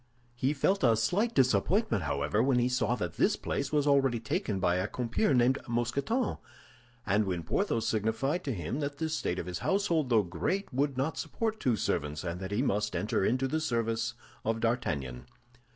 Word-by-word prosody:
He 130 +3 0
felt 190 +7 +1
a 115 -3 +5
slight 190 - +1
disappointment, 130 - +2
however, 70 +9 0
when 130 0 +3
he 125 +1 +2
saw 125 -2 +1
that 90 -8 -4
this - - +3
place 140 -1 -3
was 150 -2 +2
already 135 -4 +3
taken 110 -2 -2
by 90 -1 +2
a 90 +2 0
compeer 125 - 0
named 125 0 +3
Mousqueton, 130 - -1 0.7
and 105 +2 +2
when 90 -3 -2
Porthos 115 - 0
signified 110 - 0
to 140 - -1
him 95 - -3
that 145 -1 -3
the 160 +1 -2
state 95 - -1
of 85 - -3
his 90 -2 -4
household, 170 -8 +1
though 110 -3 +4
great, 95 - -2
would 135 +1 0
not 140 +5 -1
support 220 -1 -2
two 125 - +2
servants, 75 -6 -2
and 85 0 -4
that 95 0 -5
he 105 +5 0
must 105 -4 0
enter 105 -1 0
into 130 +6 +1
the 155 +4 -1
service 115 -3 -1 0.3
of 115 0 0
D'Artagnan. 70 - -2
120 Hz, 185 wpm, -30 LUFS, 105-140 Hz, 0.7 s, a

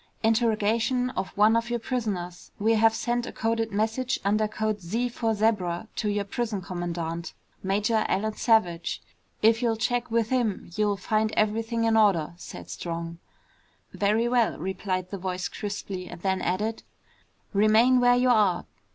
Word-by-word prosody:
"Interrogation 225 +2 +2
of 190 -4 -3
one 215 +2 +5
of 230 +1 0
your 240 - 0
prisoners. 210 -8 -4
We 220 +2 +2
have 225 0 +4
sent 240 +1 -1
a - - -5
coded 225 0 -1
message, 225 +5 0
under 215 +2 +2
code 215 -1 -2
Z 230 +8 -1
for 225 -2 -1
Zebra 205 -3 0
to 210 - 0
your 205 0 0
prison 220 0 -2
commandant, 170 -2 -4 0.3
Major 210 +3 +1
Alan 215 +2 0
Savage. 210 -8 +1 0.4
If 225 +2 +5
you'll 230 -2 +1
check 245 +2 -1
with 230 -1 +1
him, 230 -9 -1
you'll 210 -1 +1
find 215 +2 0
everything 225 +2 0
in 225 -1 +3
order," 195 -8 +3
said - - -9
Strong. 170 0 -5 0.7
"Very 215 +3 +1
well," 240 -2 +2
replied 185 +1 -3
the 200 - -4
voice 185 -1 -3
crisply, 200 -2 -5
and 175 - -9
then 190 -1 0
added, 210 +5 -1 0.7
"Remain 220 +5 +5
where 245 0 +5
you 250 +1 +3
are. 210 -7 +3
215 Hz, 155 wpm, -26 LUFS, 190-230 Hz, 0.7 s, one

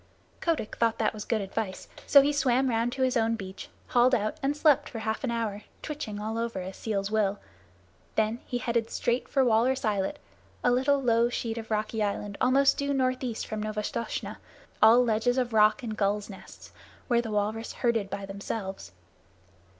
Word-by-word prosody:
Kotick 330 -10 -1
thought 230 -1 +2
that 225 - 0
that - - +1
was 210 -1 -7
good 225 -3 0
advice, 195 0 -4 0.2
so 280 -1 +8
he 290 +1 +1
swam 265 -2 +2
round 230 +1 +1
to 265 0 -1
his 255 -1 +1
own 230 -1 +2
beach, 190 -3 -8 0.2
hauled 250 +1 +4
out, 215 -2 -1
and 280 +2 0
slept 295 -3 +3
for 235 - -7
half 220 +2 -3
an 260 - 0
hour, 225 -3 -2 0.2
twitching 285 -9 -5
all 220 +2 -3
over, 230 -4 -2
as 185 +1 -6
seals 200 -2 -2
will. 205 -2 +1 0.8
Then 220 +2 +1
he 245 - -2
headed 235 -2 -1
straight 240 +1 -1
for 270 -2 +3
Walrus 245 +3 +2
Islet, 210 +6 0 0.5
a 245 - +4
little 270 +3 +3
low 235 -2 +3
sheet 230 -1 -3
of 225 - -9
rocky 215 0 -1
island 205 0 -2
almost 270 +2 +4
due 280 0 0
northeast 255 -3 -1
from 215 -1 -4
Novastoshnah, 215 +2 -3 0.4
all 235 +3 +7
ledges 235 +2 +1
and 245 -2 0
rock 215 +3 +4
and 220 -2 -4
gulls' 205 0 -1
nests, 190 - -13 0.4
where 235 -2 +3
the 230 - -6
walrus 215 +2 -1
herded 225 -5 0
by 200 0 -5
themselves. 195 - -6
225 Hz, 185 wpm, -28 LUFS, 210-250 Hz, 0.8 s, so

